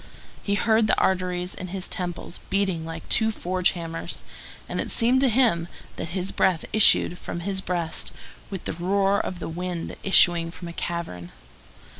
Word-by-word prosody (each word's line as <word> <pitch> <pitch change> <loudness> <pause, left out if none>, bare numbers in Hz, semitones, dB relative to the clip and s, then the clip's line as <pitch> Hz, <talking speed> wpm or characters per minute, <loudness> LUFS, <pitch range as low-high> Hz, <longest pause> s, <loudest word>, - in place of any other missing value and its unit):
He 200 - 0
heard 220 +1 +3
the - - +3
arteries 180 -1 0
in 185 - -6
his 185 +1 -3
temples 175 -1 -5
beating 190 -5 0
like 165 0 -7
two 220 0 +3
forge 185 -3 0
hammers, 165 -1 -4 0.4
and - - -2
it - - -5
seemed 250 +3 +3
to 270 - +4
him 220 -9 +2 0.3
that 165 - -4
his 185 +1 -1
breath 185 -4 +1
issued 195 -4 +5
from 170 - -5
his 190 +1 -2
breast 175 -3 -1 0.4
with 195 -3 -6
the - - -2
roar 195 +4 +1
of 185 - -3
the 175 - -5
wind 175 0 -4
issuing 175 -3 +5
from 175 +1 -9
a - - -8
cavern. 165 - -5
180 Hz, 170 wpm, -25 LUFS, 170-195 Hz, 0.4 s, issued